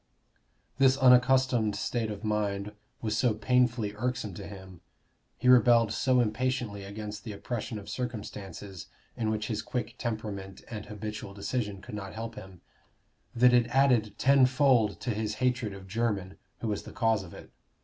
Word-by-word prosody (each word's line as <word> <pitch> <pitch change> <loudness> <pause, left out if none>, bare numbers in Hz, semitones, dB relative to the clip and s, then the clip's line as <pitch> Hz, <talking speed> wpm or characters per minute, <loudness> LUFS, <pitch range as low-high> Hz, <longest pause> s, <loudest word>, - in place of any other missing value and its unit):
This 135 0 +5
unaccustomed 125 -4 +4
state 115 -2 -2
of 105 0 -6
mind 105 -1 -1 0.3
was 110 -1 0
so 115 -1 +2
painfully 120 -2 +1
irksome 120 -2 -2
to - - -8
him 95 -3 -11 0.6
he - - -2
rebelled 120 -3 +6
so 130 -1 +2
impatiently 120 -2 -1
against 105 +1 -7
the 110 - -6
oppression 115 +2 -4
of 100 - -9
circumstances 105 -5 -6 0.3
in 110 -2 -1
which 110 0 -1
his 110 -2 -2
quick 120 0 -4
temperament 105 -5 -5
and 105 -2 -6
habitual 105 -1 -6
decision 100 -1 -3
could - - -10
not 100 -1 -6
help 115 +1 -5
him 95 -5 -11 0.7
that 125 +1 +6
it 120 -1 +4
added 120 -5 +2
tenfold 130 - +4
to 120 - -1
his 110 0 -2
hatred 125 -3 0
of 100 -1 -10
Jermyn, 100 -2 -2 0.2
who 115 - -2
was 105 - -2
the - - -11
cause 115 -4 +2
of 90 -3 -11
it. - - -12
110 Hz, 160 wpm, -29 LUFS, 105-125 Hz, 0.7 s, rebelled